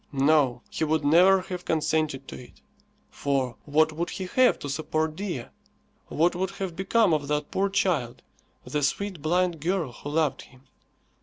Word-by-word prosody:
No, 140 -2 +2
he - - -2
would 155 -1 0
never 185 +5 +6
have 180 -1 -6
consented 155 -4 -1
to - - -7
it. - - -21 0.5
For 135 -4 -1
what 155 +2 +3
would 170 +3 -3
he 190 - -5
have 255 +7 +3
to - - -7
support 155 +2 -2
Dea? 175 -10 -4 0.6
What 170 +3 +2
would 185 +1 -2
have 195 -3 -5
become 190 0 +2
of 145 -2 -1
that 150 0 -2
poor 200 +1 +1
child, 180 -12 -1 0.4
the 150 - -2
sweet 180 +4 -2
blind 175 +1 +1
girl 170 -4 -1
who 145 - -8
loved 155 -1 0
him? 130 0 -18
160 Hz, 165 wpm, -26 LUFS, 145-185 Hz, 0.6 s, never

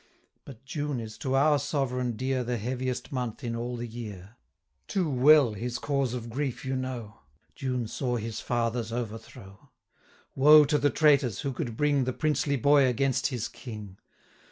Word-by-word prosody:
But 130 -1 -12
June 145 -1 -3
is 110 -2 -7
to 130 0 -1
our 145 +2 +4
Sovereign 125 -4 -1
dear 130 +1 -1
295 - - -10
The 120 -1 -1
heaviest 130 0 -3
month 125 -1 -4
in 115 -1 -3
all 120 +1 -4
the 120 - -4
year: 110 -3 -8 0.5
Too 190 -4 0
well 140 -2 +5
his 120 +4 -4
cause 140 -2 -1
of 120 -1 -6
grief 135 0 -3
you 130 0 -1
know, 125 -4 -5 0.3
June 125 -4 -3
saw 125 +2 -2
his 115 -1 -4
father's 115 -1 -1
overthrow. 110 -4 -7 0.6
Woe 150 +2 +7
to 150 +1 +1
the 145 - +3
traitors, 140 - +3
who 140 - -2
could 115 -2 -4
bring 145 -3 +2
The 130 - -1
princely 150 -1 0
boy 140 +1 +4
against 125 -1 +1
his 125 -6 -3
King! 105 -6 -9
125 Hz, 170 wpm, -28 LUFS, 115-140 Hz, 0.6 s, Woe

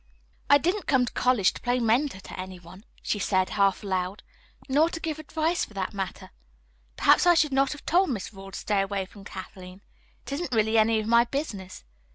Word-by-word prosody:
"I 285 - +8
didn't 360 +8 -1
come 260 -3 +3
to - - -7
college 245 -7 +2
to - - -10
play 245 0 +1
mentor 240 0 +1
to - - -10
any 185 0 -6
one," 180 +5 -15 0.2
she 205 - -1
said, 190 -1 +1
half 200 -1 +1
aloud, 185 0 -2 0.4
"nor 295 +5 +3
to 330 - -6
give 315 -2 -4
advice, 320 +2 -1
for 210 - -9
that 190 0 -3
matter. 195 -2 -5 0.7
Perhaps - - +5
I 350 - +7
should 300 -4 +2
not 270 0 +2
have 295 - -13
told 365 +2 +3
Miss 215 -5 -4
Rawle 195 0 -10
to 195 - -7
stay 205 -2 0
away 195 -1 -2
from 195 +1 -15
Kathleen. 185 0 -10 0.4
It - - -8
isn't 280 -1 -3
really 220 +1 +3
any 220 0 +3
of 215 - -3
my 235 +1 +4
business. 230 -9 -5
220 Hz, 205 wpm, -26 LUFS, 195-280 Hz, 0.7 s, I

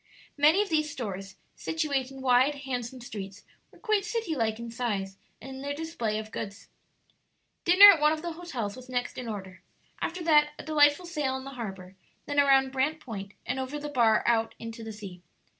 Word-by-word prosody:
Many 310 +7 +5
of 415 - -9
these 305 -2 +1
stores, 195 -8 -6 0.2
situate 285 -5 -1
in 270 0 -10
wide, 260 +3 +4
handsome 250 -1 -4
streets, 200 -4 -8 0.3
were - - -20
quite 430 -2 +1
city 455 -8 -2
like 220 -4 0
in 235 0 -7
size 205 -5 -3 0.2
and 265 0 -9
in - - -8
their 285 +1 -3
display 290 -9 -3
of 215 0 -6
goods. 200 +1 -7 1.0
Dinner 390 +4 +10
at 325 - 0
one 300 0 +5
of 315 0 -3
the 345 - -3
hotels 280 -12 -5
was 255 0 -12
next 245 -1 -2
in 250 - -6
order; 190 -4 -7 0.4
after 345 +1 -3
that 300 -2 +4
a - - -8
delightful 300 +2 +4
sail 300 -6 -2
on 265 - -5
the 275 - -8
harbor, 195 -7 -7 0.3
then 290 0 0
around 270 -1 +5
Brant 275 +4 0
Point 200 -7 -8
and 255 +2 -2
over 265 +3 -4
the 295 0 -5
bar 235 -6 +3
out 225 -1 +1
into 230 0 -8
the 220 - -6
sea. 200 -4 -9
260 Hz, 195 wpm, -28 LUFS, 220-300 Hz, 1.0 s, Dinner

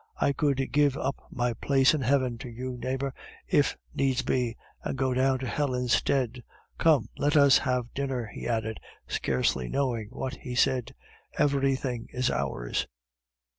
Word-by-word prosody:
I 140 - +2
could 140 -3 0
give 145 -1 +3
up 135 - -1
my 120 -1 -1
place 135 +4 +3
in 155 - 0
heaven 130 -2 +1
to 125 - -7
you, 125 +2 -5
neighbor, 130 +2 -2 0.3
if - - +2 0.2
needs 130 -2 +1
be, 125 -3 0 0.3
and - - -3
go 130 0 +1
down 130 +1 +2
to 130 - -5
hell 140 0 0
instead. 125 0 +1 0.4
Come, 145 -9 +4
let 145 +1 +3
us 140 -2 +7
have 125 -2 -1
dinner," 135 -3 -2
he - - -5
added, 110 -2 -1 0.3
scarcely 65 -1 0
knowing 120 -6 -1
what 130 +1 -5
he 125 -1 -6
said, 125 -1 +1 0.4
"everything 135 -4 +1
is 130 0 0
ours." 60 -3 -2
130 Hz, 155 wpm, -28 LUFS, 120-135 Hz, 0.4 s, us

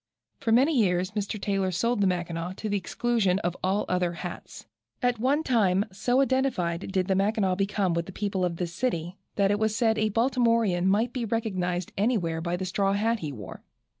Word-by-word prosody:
For 225 - -1
many 270 +7 +4
years 185 -5 +2
Mr. 210 0 -3
Taylor 195 -1 0
sold 220 +5 0
the 195 - +4
Mackinaw 175 -1 -2
to 215 - -5
the 205 - 0
exclusion 200 0 +1
of 175 0 -1
all 190 +3 +1
other 180 -1 0
straw 175 +1 -4
hats. - - -11 0.4
At 245 -2 +1
one 280 +6 +2
time 205 -7 +2
so 245 +7 +1
identified 235 -11 0
did 190 -1 +1
the 195 - +2
Mackinaw 195 0 +1
become 195 -1 0
with 170 0 -2
the - - -7
people 195 -1 -2
of 175 -2 0
this 170 0 -4
city, 180 -4 -2 0.2
that 200 -1 +3
it 205 - +1
was 220 -1 +1
said 220 -1 +2
a 215 0 +2
Baltimorean 230 -5 +2
might 220 +5 +2
be 250 - -2
recognized 185 -6 -2
anywhere 185 -8 +1
by 170 +1 -2
the 185 - -3
straw 195 +2 +1
hat 225 +3 +1
he 155 -5 -4
wore. 105 -8 -9
195 Hz, 200 wpm, -27 LUFS, 180-225 Hz, 0.4 s, many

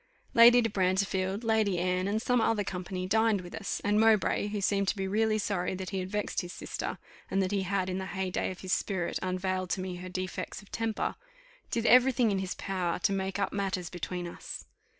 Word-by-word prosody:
Lady 240 0 +8
de 225 - 0
Brantefield, 190 +1 0
Lady 220 -4 +2
Anne, 180 +1 0
and 210 +2 0
some 245 -1 +2
other 220 -2 +2
company, 185 -1 -4
dined 220 0 +2
with 175 -1 -10
us; 200 - -3
and 210 +1 +2
Mowbray, 220 -2 +3
who 210 0 -3
seemed 200 0 +1
to - - +1
be 195 -1 -2
really 215 +2 +2
sorry 195 -3 -1
that 185 +1 -5
he 195 - -1
had 185 0 -4
vexed 210 +1 -1
his 175 -1 -7
sister, - - -4 0.3
and 195 - +1
that 190 0 +1
he 200 -1 +1
had 190 0 0
in 185 0 -2
the 190 - -4
heyday 190 -1 -2
of 185 - -8
his 185 -1 -1
spirit 185 -4 -1
unveiled 185 0 -1
to 190 - -1
me 185 -1 -4
her 185 +1 -7
defects 185 0 -4
of 200 - -17
temper, 225 -1 -1 0.6
did 230 0 -1
every 250 +3 +7
thing 240 -3 +2
in 195 - 0
his 190 0 -3
power 185 -3 -2
to 200 +2 +1
make 190 0 -2
up 200 - -1
matters 190 -4 -2
between 180 0 -4
us. 170 - -8
195 Hz, 220 wpm, -30 LUFS, 185-210 Hz, 0.6 s, Lady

